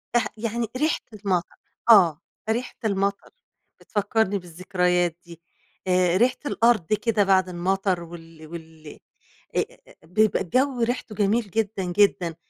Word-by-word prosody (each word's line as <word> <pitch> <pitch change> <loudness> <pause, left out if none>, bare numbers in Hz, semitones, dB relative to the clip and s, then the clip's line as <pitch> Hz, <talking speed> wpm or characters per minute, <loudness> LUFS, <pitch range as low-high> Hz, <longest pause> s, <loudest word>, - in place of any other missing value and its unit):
رح 240 -3 +3
يعني 230 +1 -2
ريحة 305 +3 +1
المطر 190 -4 -2 0.3
آه، 170 -8 +6 0.3
ريحة 240 +3 -2
المطر، 200 -1 -1 0.5
بتفكّرني 205 -1 0
بالذكريات 180 0 0
دي 170 -1 -13 0.5
آآ، 180 -1 +3
ريحة 250 +3 +3
الأرض 230 - +2
كده 210 0 +2
بعد 190 -2 +3
المطر 185 0 -1
وال 165 -2 -12
وال 160 -1 -11 0.7
أ - - +3
أ - - -6
بيبقى 215 +6 +2
الجو 255 +6 0
ريحته 235 -2 -2
جميل 210 +1 +1
جدًا، 210 -1 -1
جدًا، 180 -2 +2
195 Hz, 125 wpm, -24 LUFS, 175-220 Hz, 0.7 s, آه